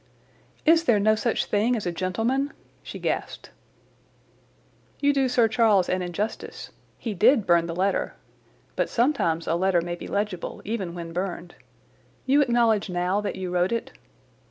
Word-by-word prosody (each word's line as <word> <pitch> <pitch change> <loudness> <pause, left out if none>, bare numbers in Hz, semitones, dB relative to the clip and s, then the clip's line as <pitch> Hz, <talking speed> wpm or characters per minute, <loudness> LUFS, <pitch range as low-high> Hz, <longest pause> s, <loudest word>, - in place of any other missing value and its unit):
"Is 330 +1 +5
there 215 -8 +4
no 215 +2 +4
such 220 +2 0
thing 220 +4 +1
as 220 - -4
a 175 - 0
gentleman?" 225 +11 -1 0.3
she - - -8
gasped. - - -4 1.5
"You 285 0 +3
do 270 -2 +1
Sir 240 -2 +3
Charles 215 -4 +3
an 185 0 0
injustice. 180 +5 -5 0.3
He 225 - -4
did 225 +4 +4
burn 170 -2 +3
the 165 - -4
letter. 195 +2 0 0.6
But - - 0
sometimes 230 - +1
a - - 0
letter 180 +1 +2
may 175 +1 -4
be 175 - -7
legible 200 -3 -3
even 195 -6 -3
when 165 -1 -7
burned. 175 -1 -4 0.7
You 280 +3 +4
acknowledge 235 -6 +2
now 180 +3 0
that 210 - -3
you 185 -1 -4
wrote 180 +2 +1
it?" 230 -1 -2
205 Hz, 155 wpm, -25 LUFS, 175-235 Hz, 1.5 s, Is